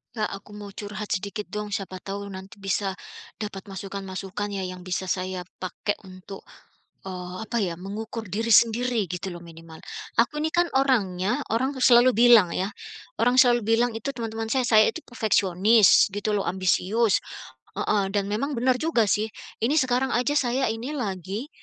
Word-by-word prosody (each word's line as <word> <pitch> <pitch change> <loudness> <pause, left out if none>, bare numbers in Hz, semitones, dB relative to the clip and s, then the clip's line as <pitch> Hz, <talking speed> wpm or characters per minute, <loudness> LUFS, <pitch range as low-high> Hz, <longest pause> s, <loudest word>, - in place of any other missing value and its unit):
Kak, 215 -1 -1
aku 195 +1 -9
mau 205 -1 -8
curhat 205 +1 -7
sedikit 200 +1 -3
dong. 210 0 -5
Siapa 190 -2 -4
tahu 200 +2 -6
nanti 195 +2 -10
bisa 195 0 -1 0.5
dapat 205 -1 -6
masukan-masukan 195 0 -5
ya 195 - -2
yang 185 -1 -6
bisa 185 0 -3
saya 185 0 -2 0.2
pakai 190 +2 -3
untuk, 185 +1 -11 0.6
eee, 180 -1 -6
apa 225 +2 -3
ya, 180 -4 -1
mengukur 215 +4 -5
diri 225 +5 -2
sendiri 230 -2 +3
gitu 180 +1 -4
loh 175 - -9
minimal. 165 -1 -13 0.4
Aku 280 +5 -2
ini 315 - 0
kan 345 0 +2
orangnya 205 -8 +1
orang 260 +5 0
tuh 260 - -7
selalu 250 0 +6
bilang 230 -6 +6
ya, 190 +2 -1 0.5
orang 245 +2 +5
selalu 240 -2 +4
bilang 230 +2 +2
itu 225 - -4
teman-teman 225 -2 -4
saya, 260 -2 +1
saya 215 -1 +7
itu 330 - -7
perfeksionis 205 -2 +4
gitu 205 +1 -2
loh, 195 - -2
ambisius 190 +4 +2 0.6
heeh, 205 -1 +1
dan 200 -1 +1
memang 275 +8 -1
benar 250 0 +2
juga 250 -9 +1
sih. 210 +1 +2 0.4
Ini 235 +6 +2
sekarang 260 +1 0
aja 245 +4 +1
saya 255 -1 +1
ini 230 +6 -4
lagi 205 - -4
210 Hz, 165 wpm, -25 LUFS, 190-235 Hz, 0.6 s, saya